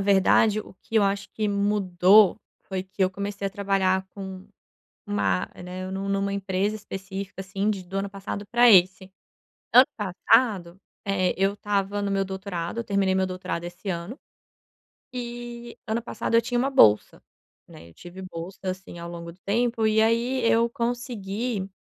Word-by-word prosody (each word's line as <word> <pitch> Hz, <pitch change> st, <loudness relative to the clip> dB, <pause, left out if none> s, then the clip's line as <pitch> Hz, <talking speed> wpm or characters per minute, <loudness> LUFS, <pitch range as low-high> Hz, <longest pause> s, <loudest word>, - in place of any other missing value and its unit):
verdade, 200 Hz, +2 st, +4 dB
o -, -, -13 dB
que -, -, -12 dB
eu 215 Hz, -, +5 dB
acho 200 Hz, 0 st, 0 dB
que 215 Hz, -1 st, -1 dB
mudou 200 Hz, -1 st, +4 dB, 0.3 s
foi 190 Hz, -1 st, -3 dB
que 190 Hz, +1 st, -4 dB
eu 185 Hz, -, +3 dB
comecei 200 Hz, +1 st, -4 dB
a -, -, -3 dB
trabalhar 190 Hz, -2 st, +1 dB
com 190 Hz, -2 st, -8 dB, 0.6 s
uma 100 Hz, -3 st, 0 dB, 0.2 s
né, 185 Hz, +1 st, -6 dB
nu 195 Hz, +1 st, -4 dB
numa 195 Hz, 0 st, 0 dB
empresa 200 Hz, +1 st, -1 dB
específica, 195 Hz, -1 st, -7 dB
assim, 195 Hz, +2 st, -2 dB
de 200 Hz, -3 st, -2 dB
do 185 Hz, +2 st, -6 dB
ano 200 Hz, 0 st, -2 dB
passado 200 Hz, +1 st, -6 dB
para 240 Hz, +1 st, +6 dB
esse. 190 Hz, -1 st, +4 dB, 0.6 s
Ano 255 Hz, +2 st, +8 dB
passado, 190 Hz, -2 st, +2 dB, 0.3 s
eh, 190 Hz, -2 st, +1 dB
eu 195 Hz, +1 st, +2 dB
estava 205 Hz, 0 st, -1 dB
no 200 Hz, -, -1 dB
meu 195 Hz, 0 st, +1 dB
doutorado, 190 Hz, 0 st, -5 dB
eu 235 Hz, -, -2 dB
terminei 200 Hz, -2 st, +1 dB
meu 190 Hz, 0 st, +2 dB
doutorado 185 Hz, -2 st, -4 dB
esse 175 Hz, +3 st, -8 dB
ano, 180 Hz, -, -4 dB, 0.9 s
e 240 Hz, -1 st, -7 dB
ano 225 Hz, +2 st, -1 dB
passado 235 Hz, -, -4 dB
eu 230 Hz, -, +6 dB
tinha 245 Hz, +1 st, -1 dB
uma 260 Hz, +3 st, +2 dB
bolsa, 105 Hz, -, +4 dB, 0.4 s
né, 85 Hz, -, -14 dB
eu 85 Hz, -, -19 dB
tive 175 Hz, +2 st, -11 dB
bolsa, 185 Hz, 0 st, -8 dB
assim, 185 Hz, -2 st, -5 dB
ao 170 Hz, 0 st, -7 dB
longo 170 Hz, 0 st, -8 dB
do 180 Hz, -, -23 dB
tempo, 230 Hz, +2 st, 0 dB
e 220 Hz, 0 st, +4 dB
aí 235 Hz, +3 st, +1 dB
eu 230 Hz, +1 st, +3 dB
consegui 235 Hz, -3 st, -3 dB
195 Hz, 170 wpm, -25 LUFS, 185-215 Hz, 0.9 s, Ano